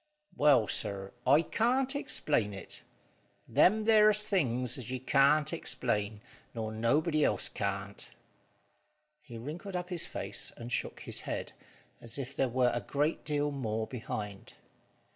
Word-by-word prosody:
"Well, 140 -7 +5
sir, 100 -1 0
I 145 +5 +6
can't 255 - +1
explain 115 - 0
it. 95 - -9 0.7
Them 215 +3 +4
there's 215 -1 +5
things 125 - +1
as 125 - -8
you 130 0 -3
can't 145 +4 +3
explain, 110 -9 -2 0.3
nor 110 -1 -3
nobody 150 +8 +2
else - - +1
can't." - - -4 1.1
He 120 -6 -10
wrinkled 165 - -6
up 180 0 -3
his 175 -3 0
face - - -4
and 120 +1 -8
shook - - -2
his - - -3
head, - - -4 0.5
as 115 +1 -4
if 135 0 -5
there 135 -4 +1
were 125 0 +2
a 120 - -1
great 145 +9 -1
deal 145 -1 0
more 110 -5 -2
behind. 105 -3 -6
135 Hz, 140 wpm, -31 LUFS, 115-160 Hz, 1.1 s, I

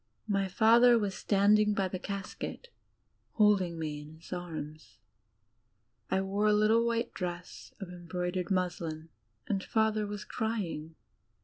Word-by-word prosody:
My 195 -2 +1
father 235 +5 +6
was 205 -3 -1
standing 210 +2 +3
by 195 -1 +1
the 185 0 -5
casket 200 - -6 0.6
holding 200 -6 +3
me 155 -2 -3
in 150 +1 -12
his 165 +3 -10
arms. 155 -4 -7 1.1
I 190 - +2
wore 200 +2 0
a 210 - +5
litde 215 +2 +4
white 235 0 -1
dress 175 -1 -6
of 195 - -7
embroidered 180 +1 -3
muslin, 170 -4 -2 0.4
and 195 -2 -1
Father 220 -1 +1
was 205 -1 -6
crying. 175 -8 -3
195 Hz, 130 wpm, -31 LUFS, 175-210 Hz, 1.1 s, father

